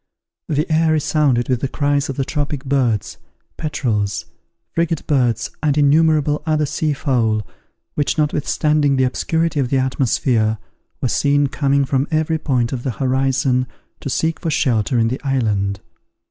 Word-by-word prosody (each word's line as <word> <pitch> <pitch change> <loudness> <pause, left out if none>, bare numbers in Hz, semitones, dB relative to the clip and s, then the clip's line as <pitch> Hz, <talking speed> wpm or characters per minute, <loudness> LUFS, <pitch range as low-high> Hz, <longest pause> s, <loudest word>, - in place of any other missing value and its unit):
The 150 0 0
air 160 0 +3
resounded 145 -5 +1
with 125 -3 0
the 135 - 0
cries 145 0 0
of 135 - -3
the 135 - 0
tropic 145 -1 -3
birds, 130 -6 0 0.4
petrels, 105 - -2 0.5
frigate 165 -2 -1
birds, 120 -5 +1
and 150 -1 +1
innumerable 150 0 +3
other 155 -1 +1
sea 155 +1 -1
fowl, 115 -7 0 0.5
which 145 - -1
notwithstanding 150 -1 +1
the 130 - +2
obscurity 160 +5 0
of 130 -3 0
the 135 - +2
atmosphere, 125 -4 +1 0.4
were 130 - +1
seen 145 +3 +2
coming 140 0 +1
from 135 +1 0
every 160 0 0
point 125 -6 0
of 125 - -3
the 130 -1 -3
horizon, 130 -1 +1 0.3
to - - -5
seek 160 +5 -1
for 165 - -2
shelter 120 -6 +1
in 115 -1 +2
the 130 - -4
island. 105 -8 0
140 Hz, 150 wpm, -19 LUFS, 125-150 Hz, 0.5 s, air